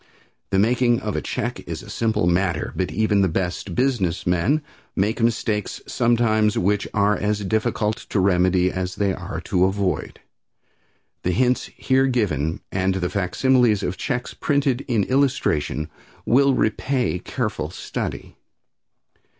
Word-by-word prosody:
The 95 - +1
making 120 +3 +3
of - - -3
a - - -1
check - - -3
is - - -5
a - - -12
simple 110 -4 0
matter, 90 -2 0
but 95 -1 -1
even 105 -2 +2
the 95 - +3
best 90 +1 -3
business 120 -10 0
men 95 - +1 0.3
make 105 +5 0
mistakes 110 -3 0
sometimes 115 -3 +2
which 100 +2 +1
are 105 0 +2
as 105 -1 -1
difficult 110 +1 0
to 105 - 0
remedy 90 -1 +3
as 95 0 -3
they 100 -2 +1
are 95 +2 -7
easy - - -6
to 90 -1 +2
avoid. 95 -1 -1 1.0
The 90 - 0
hints 125 +2 +2
here 135 0 +2
given 85 - 0
and 95 0 0
the 90 -2 -2
facsimiles 115 +3 +2
of 90 - -2
checks 125 - -3
printed 140 -3 0
in 115 -6 +2
illustration 125 - 0 0.4
will 135 +2 +4
repay 125 -2 0
careful 105 -12 -3
study. - - -5
105 Hz, 140 wpm, -22 LUFS, 95-120 Hz, 1.0 s, will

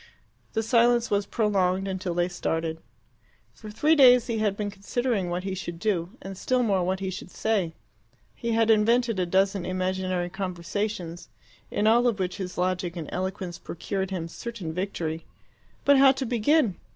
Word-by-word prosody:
The 220 - 0
silence 235 +1 +3
was 200 -1 +1
prolonged 195 -3 +1
until 185 -2 -3
they 175 0 +2
started. 165 -2 -2 0.7
For 215 - -11
three 295 +9 +3
days 250 -4 +7
he 230 -2 -2
had 205 -2 0
been 205 -1 -2
considering 205 0 -1
what 175 +1 -2
he 190 0 -3
should 175 -2 -5
do, 185 +2 -1
and 195 0 -6
still 250 +6 +1
more 195 -5 +2
what 190 +2 -1
he 190 -1 -2
should 185 - -7
say. 190 -6 -1 0.6
He 235 -1 -3
had 225 0 +4
invented 230 0 +3
a 180 - 0
dozen 190 +1 +2
imaginary 185 -1 -1
conversations, 185 -1 -4 0.4
in 210 - -1
all 235 +3 +5
of 230 -4 +1
which 185 -1 -2
his 185 -3 -6
logic 180 -1 -1
and 165 -4 -6
eloquence 185 -1 -4
procured 190 +3 -4
him 180 -4 -3
certain 190 -2 -6
victory. 165 -3 -3 0.6
But 285 -1 +6
how 270 -1 +7
to 265 0 -3
begin? 240 - +2
195 Hz, 170 wpm, -26 LUFS, 180-225 Hz, 0.7 s, days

